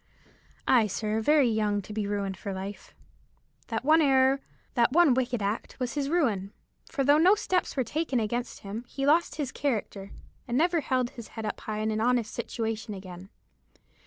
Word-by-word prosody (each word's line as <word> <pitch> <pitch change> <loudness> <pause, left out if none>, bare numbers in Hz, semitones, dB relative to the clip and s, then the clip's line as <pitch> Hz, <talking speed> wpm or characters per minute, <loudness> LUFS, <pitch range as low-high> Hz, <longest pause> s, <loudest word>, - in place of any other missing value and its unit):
"Ay, 235 -4 +5
sir, 215 +2 -2
very 295 +2 +4
young 210 -2 +1
to 205 +2 -8
be 210 -1 -2
ruined 200 -2 -2
for 195 +1 -5
life. 195 +2 -7 0.7
That 225 +2 -3
one 315 +2 +6
error, 270 -1 +4 0.3
that 240 -2 +3
one 330 -2 +5
wicked 245 -3 -1
act, 205 +6 -3
was 250 -2 -2
his 280 -2 -1
ruin; 225 - +1 0.4
for 280 -4 -1
though 290 +3 +5
no 370 +5 +6
steps 370 -7 -1
were 260 - +2
taken 295 -1 -1
against 235 +3 -3
him, 205 +4 -6
he 275 - -3
lost 320 +4 +3
his 280 -4 -3
character, 215 -7 -3 0.4
and 240 - 0
never 340 +3 +3
held 255 -3 0
his 235 -3 -9
head 220 - -3
up 210 - -4
in 215 0 -1
an 215 0 -1
honest 240 -2 +1
situation 225 -2 -3
again. 185 0 -10
235 Hz, 180 wpm, -28 LUFS, 210-275 Hz, 0.7 s, one